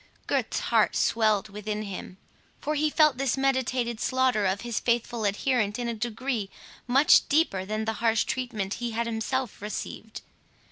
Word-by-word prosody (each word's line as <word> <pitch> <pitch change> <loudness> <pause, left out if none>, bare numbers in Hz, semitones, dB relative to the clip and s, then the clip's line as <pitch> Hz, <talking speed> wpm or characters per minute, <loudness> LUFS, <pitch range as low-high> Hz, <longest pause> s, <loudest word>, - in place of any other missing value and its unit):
Gurth's - - -1
heart - - +2
swelled 215 -2 +2
within 210 +1 -4
him; 190 -2 -7 0.4
for 300 - -2
he 305 0 +1
felt 305 -4 +3
this 275 -1 +1
meditated 255 -3 0
slaughter 255 -6 +2
of 190 +1 -1
his 235 -2 -2
faithful 235 -1 0
adherent 210 +1 0
in 240 -1 -3
a 235 - -1
degree 230 -1 -3 0.4
much 270 +4 +5
deeper 280 - +2
than 215 +2 -2
the 220 - -1
harsh 230 -1 +3
treatment 220 -7 -3
he 240 -1 -2
had 235 +1 -1
himself 230 +1 -2
received. 215 +1 -6
235 Hz, 155 wpm, -27 LUFS, 210-255 Hz, 0.4 s, much